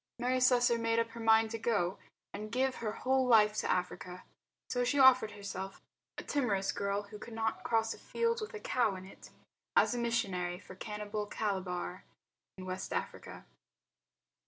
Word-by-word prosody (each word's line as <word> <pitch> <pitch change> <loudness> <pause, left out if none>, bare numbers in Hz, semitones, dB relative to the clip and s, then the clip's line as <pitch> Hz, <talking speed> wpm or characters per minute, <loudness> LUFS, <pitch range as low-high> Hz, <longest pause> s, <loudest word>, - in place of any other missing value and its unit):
Mary 250 +1 +1
Slessor 245 -2 +4
made 230 0 +1
up 230 0 +1
her 235 - -9
mind 225 0 +4
to 225 - -4
go 205 -6 +1
out 195 - -17 0.3
and 215 +1 -6
give 260 +2 +1
her 220 -2 -2
whole 260 +3 +1
life 215 -3 +6
to - - -1
Africa. 180 0 -2 0.4
So 245 0 0
she 285 +4 +1
offered 255 -5 +6
herself, 195 -1 -6 0.4
a - - -5
timorous 210 -9 0
girl 200 0 -1
who 210 +1 -11
could 225 +1 -9
not 225 -1 -1
cross 225 -1 +1
a - - -13
field 465 0 -1
with 430 +1 -6
a - - -5
cow 240 - +1
in 185 0 -8
it, 195 - -13 0.5
as - - +5
a 245 - -2
missionary 195 -7 -1
for 185 - -12
cannibal 210 +1 -4
Calabar, 185 -3 -3 0.5
in 185 - -8
West 185 +1 -5
Africa. - - -5
220 Hz, 180 wpm, -33 LUFS, 195-245 Hz, 0.5 s, life